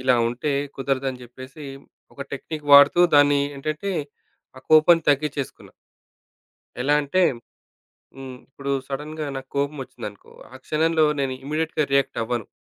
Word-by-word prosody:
ఇలా 130 -1 +4
ఉంటే 125 +5 -3 0.2
కుదరదని 135 -1 -2
జెప్పేసి 130 +4 -11 0.5
ఒక - - -13
టెక్‌నిక్ 150 +2 -6
వాడుతూ 145 +4 +8 0.2
దాన్ని 145 0 +5 0.2
ఏంటంటే 155 +7 -4 0.7
ఆ - - -13
కోపం 155 +2 +7
తగ్గించేసుకున్నా. 145 -1 -3 1.1
ఎలా 145 +2 +2
అంటే? 145 +6 0 1.0
హ్మ్. 130 -1 -9
ఇప్పుడు 140 +1 -6 0.2
సడెన్‌గా 150 +3 -5
నాకు 135 0 -9
కోపం 140 +2 -1
ఒచ్చిందనుకో 100 -4 -10 0.2
ఆ - - -10
క్షణంలో 160 0 +2
నేను 135 -1 -1
ఇమ్మీడియేట్‌గా 155 +1 -1
రియాక్ట్ 140 -3 +1
అవ్వను. 120 -2 -3
140 Hz, 125 wpm, -23 LUFS, 135-155 Hz, 1.1 s, వాడుతూ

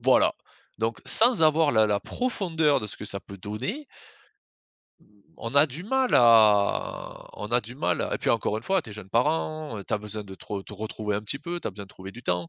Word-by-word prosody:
Voilà. - - +3 0.4
Donc, 115 +1 -2
sans 230 -5 +7
avoir 155 -1 +4
la 110 -1 +4
la 100 -1 0
profondeur 170 - 0
de 105 - -5
ce - - -5
que 105 - -7
ça 100 - -1
peut 100 0 -13
donner 110 - -5 1.5
on 115 +4 -6
a 145 +2 +7
du 155 +6 -5
mal 265 +2 0
à 110 -4 +3
on 105 - -6
a 120 +1 +2
du 120 +3 -8
mal 90 - -1
à - - -2
et - - -3
puis - - 0
encore 105 - 0
une 110 - -6
fois, 190 +4 +1
tu 125 - -13
es - - -8
jeune 95 -3 -10
parent, 155 +1 -1
heu, 100 - -8
tu - - -7
as 105 - +1
besoin 105 0 -6
de 95 -1 -10
te - - -15
re 100 -2 -4
te - - -11
retrouver 105 0 -4
un 105 - -3
petit 110 +6 -2
peu, 170 +4 -5
tu - - -4
as - - -6
besoin 100 +1 -9
de - - -20
trouver 95 0 -11
du 120 - -12
temps, 90 -1 -2
115 Hz, 245 wpm, -25 LUFS, 105-155 Hz, 1.5 s, sans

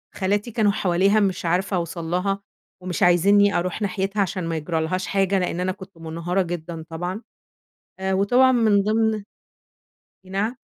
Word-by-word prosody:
خالاتي 205 +4 -1
كانوا 210 -2 +2
حواليها 195 +3 +2
مش 190 -2 0
عارفة 185 +4 0
أوصَل 170 0 -4
لها، 195 +2 0 0.4
ومش 180 -2 -2
عايزيني 200 +4 +5
أروح 180 +4 -3
ناحيتها 195 +1 -1
عشان 185 -1 -2
ما 165 - -2
يجرالهاش 160 +3 -2
حاجة 195 -1 +1
لأن 180 -1 -2
أنا 185 +1 0
كنت 190 -1 -12
منهارة 165 +3 -2
جدًا 170 -2 -5
طبعًا. 180 +6 -4 0.8
آآ 190 0 -1
وطبعًا 245 +7 +4
من 220 -5 +3
ضمن 220 0 +1 1.0
نعم؟ 200 +6 -2
190 Hz, 145 wpm, -23 LUFS, 175-205 Hz, 1.0 s, عايزيني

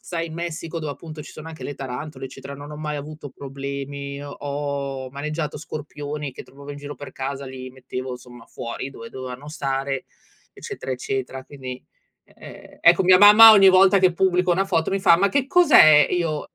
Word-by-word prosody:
sai, 165 -1 -4
in 160 - -9
Messico, 165 0 -5
dove 155 -2 -4
appunto 155 0 -10
ci - - -12
sono 155 +1 -10
anche 160 - -10
le 145 - -5
tarantole, 135 +3 -7
eccetera, 140 +1 -10
non 145 +1 -10
ho 150 - -8
mai 150 -1 -4
avuto 150 0 -8
problemi. 140 +1 -7
Ho 145 - -8
ho 140 -2 -5
maneggiato 150 +2 -4
scorpioni 150 -1 -6
che - - -10
trovavo 140 +2 -13
in 145 - -9
giro 145 0 -8
per 145 -2 -10
casa, 135 +1 -5
li 130 -1 -8
mettevo, 130 0 -7
insomma, 125 -1 -12
fuori 115 +3 -6
dove 230 +11 -10
dovevano 130 +2 -8
stare, 135 -2 -3 0.5
eccetera, - - -8
eccetera. 130 +1 -4
Quindi, 130 -3 -9 0.5
e - - -15 0.3
ehm, - - -19
ecco, - - +5
mia 185 0 +6
mamma 210 +2 +10
ogni 195 -3 +7
volta 190 +1 +5
che 185 -1 +3
pubblico 180 -1 +2
una 190 +3 +1
foto 165 -3 0
mi 195 - -1
fa: 170 -3 +6
“Ma 200 +3 +2
che 275 +3 0
cos'è?” 270 - +6
Io 165 -4 -2
145 Hz, 190 wpm, -22 LUFS, 135-165 Hz, 0.5 s, mamma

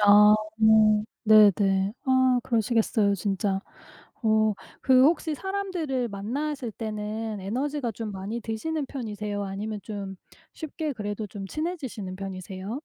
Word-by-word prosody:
아 210 +1 +8 0.9
네네. 200 -2 +5
아 260 -1 +3
그러시겠어요. 225 -3 +1
진짜. 195 +1 -1 0.6
어 220 -1 +3 0.3
그 260 0 +6
혹시 320 0 +2
사람들을 355 -9 -2
만나실 245 +5 -3
때는 215 0 -4
에너지가 255 +4 -2
좀 220 +1 -5
많이 200 +4 -5
드시는 280 +8 -3
편이세요? 210 -5 -4
아니면 205 +2 -4
좀 200 -3 -6 0.4
쉽게 310 -1 -4
그래도 210 -1 -4
좀 195 -1 -7
친해지시는 260 - -4
편이세요? 190 +3 -6
220 Hz, 270 characters per minute, -26 LUFS, 205-260 Hz, 0.9 s, 아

